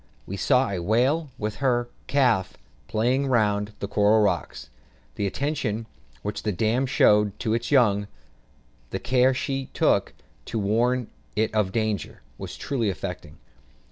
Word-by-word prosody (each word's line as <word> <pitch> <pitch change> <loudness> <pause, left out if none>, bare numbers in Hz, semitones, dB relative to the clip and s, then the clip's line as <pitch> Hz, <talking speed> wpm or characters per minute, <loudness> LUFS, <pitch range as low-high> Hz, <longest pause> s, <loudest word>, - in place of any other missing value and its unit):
We 100 - -5
saw 125 +6 +3
a 95 - -2
whale, 130 - +1
with 105 -2 -3
her 120 -3 +1 0.2
calf, 120 -9 +2 0.3
playing 125 +5 +1
round 105 -4 +1
the 100 - -4
coral 105 +2 +3
rocks; 105 - -2 0.4
the 100 - -1
attention 120 -3 -2 0.4
which 105 0 -3
the 105 - -1
dam 115 +7 +1
showed 105 -5 +3
to 110 -3 0
its 115 +1 -1
young, 105 -8 +3 0.8
the - - -3
care 125 +6 +2
she 135 0 -2
took - - +2 0.3
to 115 - -4
warn 115 +4 +1 0.3
it 110 +1 0
of 105 -3 +1
danger, 110 -4 -2 0.2
was - - -7
truly 120 -7 -1
affecting. 90 -6 -6
110 Hz, 140 wpm, -25 LUFS, 105-130 Hz, 0.8 s, saw